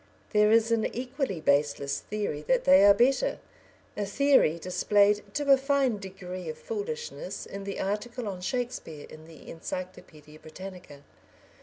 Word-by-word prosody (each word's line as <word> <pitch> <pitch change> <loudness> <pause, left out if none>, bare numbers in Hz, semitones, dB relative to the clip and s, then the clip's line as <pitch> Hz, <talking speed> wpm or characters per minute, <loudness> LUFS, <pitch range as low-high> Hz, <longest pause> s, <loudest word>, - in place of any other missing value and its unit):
There 210 -1 +4
is 225 0 +4
an 225 -1 +2
equally 250 - -3
baseless 140 -1 +1
theory 205 -8 -4
that 260 - +2
they 185 +1 +6
are 200 - +8
better, 265 - +2 0.6
a 210 - -2
theory 265 - +3
displayed 205 +4 +2
to 290 -1 +1
a 270 - +8
fine 270 -5 +1
degree 185 -1 -7
of 470 - -6
foolishness 475 +1 -5
in 200 0 -8
the 200 - -5
article 215 +4 -3
on 185 -3 -5
Shakespeare 190 - -4
in 155 0 -13
the 160 -1 -15
Encyclopaedia 160 -3 -8
Britannica. 175 -3 -11
205 Hz, 145 wpm, -28 LUFS, 180-255 Hz, 0.6 s, are